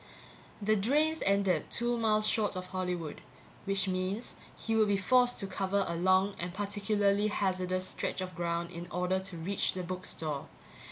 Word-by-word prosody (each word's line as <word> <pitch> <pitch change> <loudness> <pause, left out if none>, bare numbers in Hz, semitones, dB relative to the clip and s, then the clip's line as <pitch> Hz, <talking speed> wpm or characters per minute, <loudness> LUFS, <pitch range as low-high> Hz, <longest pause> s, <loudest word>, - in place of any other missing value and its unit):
The 215 +1 +3
drains 300 +10 +2
ended 195 -2 +2
two 240 0 0
miles 215 -2 +2
short 215 -2 +1
of 185 0 -4
Hollywood 180 -4 -4 0.4
which 195 -1 +2
means 185 +5 -2 0.2
he 225 - -1
would 220 -1 +4
be 200 -1 +2
forced 245 +4 +3
to - - -2
cover 195 +1 0
a 170 - -2
long 185 +3 +3
and 175 +1 -3
particularly 205 +1 +1
hazardous 185 -2 0
stretch - - -3
of 185 0 -4
ground 170 -1 -2
in 170 +1 -7
order 180 +1 0
to 190 -2 -6
reach 185 +5 0
the 185 - -4
book 185 +1 -4
store. 150 -3 -2
195 Hz, 170 wpm, -31 LUFS, 185-210 Hz, 0.4 s, would